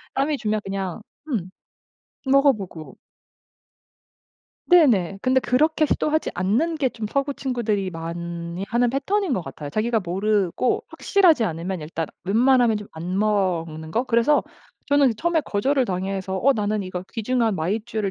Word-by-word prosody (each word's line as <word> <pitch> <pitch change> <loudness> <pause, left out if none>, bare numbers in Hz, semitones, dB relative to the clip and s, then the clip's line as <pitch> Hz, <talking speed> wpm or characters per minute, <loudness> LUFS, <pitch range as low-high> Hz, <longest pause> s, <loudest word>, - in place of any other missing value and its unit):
남이 285 +2 +1
주면 215 -3 -1
그냥 195 0 -4 0.3
음 195 - -2 0.8
먹어보고. 260 - +1 1.7
네네. 230 - +4
근데 260 0 +3
그렇게 310 +6 +2
시도하지 310 +1 0
않는 230 - 0
게 275 -4 +1
좀 225 -3 -6
서구 275 +4 -1
친구들이 225 -8 -1
많이 170 +1 -5
하는 240 0 +2
패턴인 360 - 0
것 185 -8 -1
같아요. 145 -2 -8
자기가 225 +3 0
모르고 195 +4 0
확실하지 355 - +3
않으면 175 0 -3
일단 160 +1 -4 0.2
웬만하면 240 +2 +4
좀 210 -1 -8
안 175 +4 -3
먹는 175 -7 -1
거? 235 +9 0
그래서 245 +4 +3 0.4
저는 285 -4 +3
처음에 340 +3 +1
거절을 265 +2 0
당해서 190 0 -3
'어 275 +6 +4
나는 210 -3 -1
이거 185 -1 -5
귀중한 230 -1 0
마이쮸를 210 +4 -2
215 Hz, 310 characters per minute, -23 LUFS, 185-265 Hz, 1.7 s, 네네